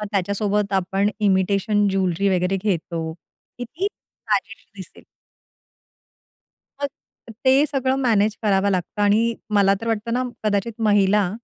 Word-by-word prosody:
मग 210 Hz, -, -4 dB
त्याच्यासोबत 200 Hz, +1 st, -1 dB
आपण 195 Hz, +2 st, +1 dB
इमिटेशन 200 Hz, +1 st, +2 dB
ज्वेलरी 190 Hz, 0 st, 0 dB
वगैरे 180 Hz, +2 st, 0 dB
घेतो. 165 Hz, -4 st, -2 dB, 0.5 s
कीती 295 Hz, -, -4 dB
साजेशी -, -, -5 dB
दिसेल. -, -, -12 dB, 1.8 s
मग 285 Hz, -, 0 dB, 0.6 s
ते 265 Hz, +2 st, +5 dB
सगळं 265 Hz, -2 st, 0 dB
मॅनेज 215 Hz, -3 st, +2 dB
करावं 200 Hz, -1 st, +2 dB
लागतं 190 Hz, +2 st, -2 dB
आणि 220 Hz, +3 st, +3 dB, 0.2 s
मला 200 Hz, -1 st, +4 dB
तर 230 Hz, -, -6 dB
वाटतं 225 Hz, +1 st, -2 dB
ना, 250 Hz, +1 st, +1 dB, 0.2 s
कदाचित 210 Hz, +2 st, 0 dB, 0.2 s
महिला 205 Hz, -2 st, +3 dB
205 Hz, 120 wpm, -22 LUFS, 195-225 Hz, 1.8 s, ते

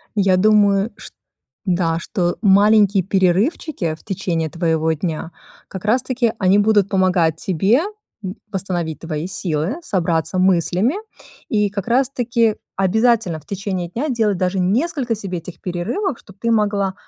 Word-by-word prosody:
Я 195 Hz, -3 st, +3 dB
думаю, 205 Hz, +1 st, +3 dB
шт -, -, -12 dB, 0.5 s
да, 175 Hz, -3 st, +1 dB
что 175 Hz, 0 st, -2 dB
маленькие 205 Hz, 0 st, +5 dB
перерывчики, 190 Hz, -, 0 dB
в -, -, -23 dB
течение 170 Hz, -5 st, -2 dB
твоего 160 Hz, -2 st, 0 dB
дня, 160 Hz, 0 st, -4 dB, 0.4 s
как 190 Hz, -, -8 dB
раз 235 Hz, +4 st, +2 dB
таки, 250 Hz, -3 st, 0 dB
они 190 Hz, +1 st, +3 dB
будут 205 Hz, -2 st, +3 dB
помогать 180 Hz, -5 st, +2 dB
тебе, 195 Hz, -, +2 dB, 0.4 s
м, 185 Hz, +1 st, -5 dB, 0.2 s
восстановить 175 Hz, -5 st, -3 dB
твои 160 Hz, -1 st, -4 dB
силы, 175 Hz, -, -2 dB
собраться 175 Hz, -, -1 dB
мыслями, 185 Hz, -, +2 dB, 0.6 s
и 210 Hz, -2 st, +1 dB
как 200 Hz, +1 st, -5 dB
раз 255 Hz, +2 st, +2 dB
таки 235 Hz, -4 st, +1 dB, 0.2 s
обязательно, 205 Hz, -2 st, +2 dB
в 150 Hz, -, -23 dB
течение 190 Hz, -3 st, -3 dB
дня, 255 Hz, -, -3 dB
делать 220 Hz, -6 st, +1 dB
даже 185 Hz, +1 st, 0 dB
несколько 240 Hz, -, 0 dB
себе 195 Hz, -4 st, -5 dB
этих 165 Hz, +1 st, -11 dB
перерывов, 195 Hz, -, -3 dB
чтоб 195 Hz, 0 st, -17 dB
ты 230 Hz, +2 st, 0 dB
могла, 205 Hz, -3 st, +1 dB
195 Hz, 145 wpm, -20 LUFS, 175-220 Hz, 0.6 s, маленькие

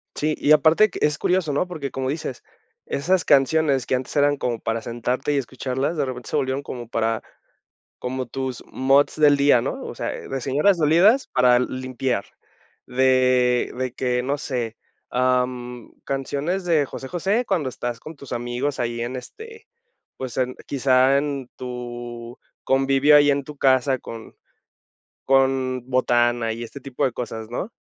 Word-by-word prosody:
Sí, 155 Hz, +1 st, 0 dB
y 150 Hz, -, +1 dB
aparte 160 Hz, +7 st, +6 dB
que, -, -, -6 dB
es 150 Hz, 0 st, +2 dB
curioso, 180 Hz, -5 st, 0 dB
¿no? 180 Hz, -, 0 dB
Porque 155 Hz, -6 st, -5 dB
como 130 Hz, -1 st, -3 dB
dices, 140 Hz, -4 st, -4 dB, 0.4 s
esas 175 Hz, +5 st, 0 dB
canciones 140 Hz, -1 st, +3 dB
que 130 Hz, -, +2 dB
antes 125 Hz, 0 st, -5 dB
eran 145 Hz, 0 st, +3 dB
como 120 Hz, -4 st, -2 dB
para 115 Hz, 0 st, -2 dB
sentarte 120 Hz, +5 st, -2 dB
y -, -, +1 dB
escucharlas, 130 Hz, +4 st, -2 dB
de 145 Hz, -, +1 dB
repente 125 Hz, -2 st, -6 dB
se -, -, -2 dB
volvieron 130 Hz, +1 st, 0 dB
como 120 Hz, -4 st, -7 dB
para 115 Hz, -1 st, -1 dB, 0.8 s
como 130 Hz, +1 st, -4 dB
tus 130 Hz, 0 st, -5 dB
moods 135 Hz, +2 st, +2 dB
del 150 Hz, -2 st, +5 dB
día, 140 Hz, -3 st, +4 dB
¿no? -, -, -4 dB
O -, -, -6 dB
sea, -, -, -3 dB
eh, -, -, -8 dB
de 135 Hz, -, -3 dB
señoras 150 Hz, +9 st, +2 dB
dolidas 175 Hz, -, +4 dB
para 125 Hz, -1 st, +5 dB
limpiar, 130 Hz, -3 st, -2 dB, 0.6 s
de 125 Hz, -1 st, +2 dB
de 130 Hz, -1 st, -2 dB
que, 125 Hz, -1 st, 0 dB
no 140 Hz, +3 st, -1 dB
sé, 120 Hz, -6 st, -3 dB, 0.3 s
am, 125 Hz, -1 st, -1 dB
canciones 145 Hz, +7 st, -2 dB
de 160 Hz, -5 st, +2 dB
José 135 Hz, -, -8 dB
José 195 Hz, -, 0 dB
cuando 175 Hz, -, 0 dB
estás 120 Hz, -2 st, -5 dB
con 155 Hz, +3 st, -10 dB
tus 140 Hz, -2 st, -11 dB
amigos 120 Hz, +4 st, -2 dB
ahí 120 Hz, -1 st, -2 dB
en, 125 Hz, +2 st, -4 dB
este, 445 Hz, -, -11 dB, 0.5 s
pues 130 Hz, -2 st, -6 dB
en 125 Hz, 0 st, 0 dB
quizá 135 Hz, 0 st, +3 dB
en 140 Hz, -3 st, -3 dB
tu 120 Hz, -1 st, -7 dB, 0.3 s
convivio 135 Hz, +2 st, +4 dB
ahí 145 Hz, 0 st, +6 dB
en 140 Hz, -1 st, 0 dB
tu 150 Hz, 0 st, -11 dB
casa 130 Hz, 0 st, +3 dB
con 115 Hz, -2 st, -10 dB, 0.9 s
con 130 Hz, -1 st, +2 dB
botana 120 Hz, -2 st, +2 dB
y 115 Hz, -, -7 dB
este 140 Hz, +4 st, -10 dB
tipo 135 Hz, -1 st, -3 dB
de 130 Hz, -, +1 dB
cosas, 110 Hz, -2 st, -6 dB
¿no? 185 Hz, -, -4 dB
130 Hz, 165 wpm, -23 LUFS, 125-145 Hz, 0.9 s, aparte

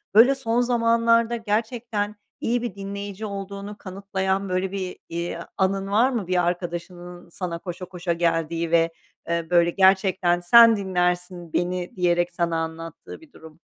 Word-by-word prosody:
Böyle, 250 Hz, +5 st, +7 dB
son 235 Hz, -2 st, 0 dB
zamanlarda 230 Hz, -1 st, +2 dB
gerçekten 220 Hz, -1 st, -2 dB, 0.3 s
iyi 240 Hz, +1 st, 0 dB
bir 240 Hz, -3 st, -4 dB
dinleyici 200 Hz, +1 st, -6 dB
olduğunu 200 Hz, 0 st, -6 dB
kanıtlayan 190 Hz, 0 st, -3 dB
böyle 185 Hz, +1 st, -1 dB
bir, 190 Hz, -2 st, -4 dB
iii, 170 Hz, +1 st, -3 dB, 0.2 s
anın 195 Hz, 0 st, 0 dB
var 230 Hz, +6 st, +4 dB
mı 225 Hz, -8 st, -3 dB
bir 180 Hz, -1 st, +1 dB
arkadaşının 175 Hz, 0 st, -5 dB
sana 170 Hz, -1 st, -5 dB
koşa 180 Hz, 0 st, -7 dB
koşa 180 Hz, -1 st, -3 dB
geldiği 165 Hz, -1 st, -1 dB
ve, 165 Hz, 0 st, +3 dB, 0.4 s
eee, 170 Hz, -1 st, -1 dB
böyle 170 Hz, -1 st, +4 dB
gerçekten 190 Hz, -1 st, +3 dB
sen 230 Hz, +6 st, +7 dB
dinlersin 180 Hz, -2 st, -2 dB
beni 180 Hz, 0 st, -2 dB
diyerek 175 Hz, -1 st, +1 dB
sana 170 Hz, -1 st, -1 dB
anlattığı 165 Hz, -, -6 dB
bir 310 Hz, -4 st, -18 dB
durum. 160 Hz, 0 st, -14 dB
185 Hz, 145 wpm, -24 LUFS, 175-205 Hz, 0.4 s, Böyle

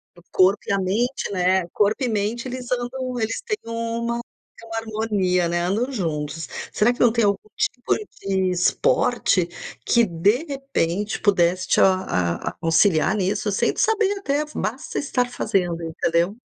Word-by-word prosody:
O 175 Hz, -, -17 dB
corpo 190 Hz, +2 st, +4 dB
e -, -, -1 dB
a 200 Hz, -, +1 dB
mente, 210 Hz, +5 st, -1 dB
né, 185 Hz, -1 st, +2 dB
corpo 210 Hz, +6 st, +1 dB
e -, -, +1 dB
mente 220 Hz, +3 st, -1 dB
eles 250 Hz, 0 st, -6 dB
andam, 250 Hz, 0 st, -2 dB
eles 225 Hz, 0 st, -2 dB
têm 430 Hz, -3 st, -2 dB
uma 230 Hz, +1 st, -2 dB, 0.5 s
harmonia, 215 Hz, -5 st, 0 dB
né, 175 Hz, 0 st, 0 dB
andam 215 Hz, +9 st, 0 dB
juntos. 160 Hz, -, -3 dB, 0.2 s
Será 215 Hz, +4 st, +3 dB
que -, -, -14 dB
não 240 Hz, -2 st, +5 dB
tem 235 Hz, 0 st, +1 dB
algum 200 Hz, +1 st, -1 dB
tipo 245 Hz, -3 st, 0 dB, 0.3 s
de 190 Hz, -1 st, 0 dB
esporte, 180 Hz, +1 st, +2 dB, 0.4 s
que 235 Hz, -, +4 dB
de 205 Hz, -, +1 dB
repente 220 Hz, -, -2 dB
pudesse 185 Hz, -3 st, +2 dB
te -, -, +3 dB
a 90 Hz, -, +1 dB
a -, -, -21 dB
auxiliar 165 Hz, +2 st, +3 dB
nisso, 200 Hz, +1 st, 0 dB
sem 195 Hz, -, +1 dB
saber 440 Hz, -4 st, +2 dB
até, 295 Hz, -5 st, 0 dB
basta 260 Hz, +7 st, -3 dB
estar 255 Hz, -3 st, 0 dB
fazendo, 180 Hz, -8 st, -1 dB
entendeu? 170 Hz, +4 st, 0 dB
210 Hz, 155 wpm, -23 LUFS, 180-245 Hz, 0.5 s, não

